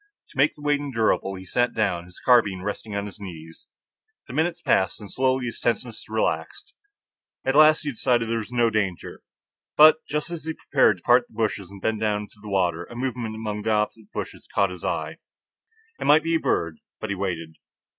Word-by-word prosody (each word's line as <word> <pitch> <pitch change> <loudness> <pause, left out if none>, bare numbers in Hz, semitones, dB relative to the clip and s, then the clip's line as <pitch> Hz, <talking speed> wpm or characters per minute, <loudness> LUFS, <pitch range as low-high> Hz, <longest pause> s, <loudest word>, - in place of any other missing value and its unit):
To - - -17
make 145 +3 +4
the 150 - -14
wait 145 -1 +2
endurable, 115 -8 0
he 95 0 -9
sat 120 +7 0
down, 90 -6 0
his 90 0 -13
carbine 105 -7 +3
resting 105 +1 -5
on 100 0 -2
his 105 +1 -10
knees. 80 -4 -10 0.6
The - - -8
minutes 160 +4 0
passed, 95 -2 +1
and 105 - -10
slowly 130 -1 +1
his 120 - -5
tenseness 120 -1 -2
relaxed. 405 0 -2 0.7
At 135 - +2
last 155 +1 +7
he 145 - -2
decided 120 -1 +1
there 115 0 0
was 110 +2 -7
no 120 -2 +2
danger; 95 -5 -2 0.6
but 155 +1 +8
just 150 +2 -2
as 165 -2 -5
he 160 - -2
prepared 130 -8 +3
to 85 - -22
part 120 0 +4
the - - -22
bushes 100 -4 -1
and 100 -1 -12
bend 110 -1 0
down 105 -1 -1
to - - -23
the 105 - -9
water, 90 -3 0
a 120 - -12
movement 120 -3 -3
among 105 -1 -4
the 110 +1 0
opposite 105 0 -2
bushes - - -6
caught 100 -2 +2
his 90 - -9
eye. - - -2 0.8
It - - -4
might 150 +2 +6
be 165 +1 0
a 165 - +3
bird. 85 - -1 0.2
But 110 - -4
he - - -1
waited. 85 -4 -4
110 Hz, 205 wpm, -24 LUFS, 100-130 Hz, 0.8 s, but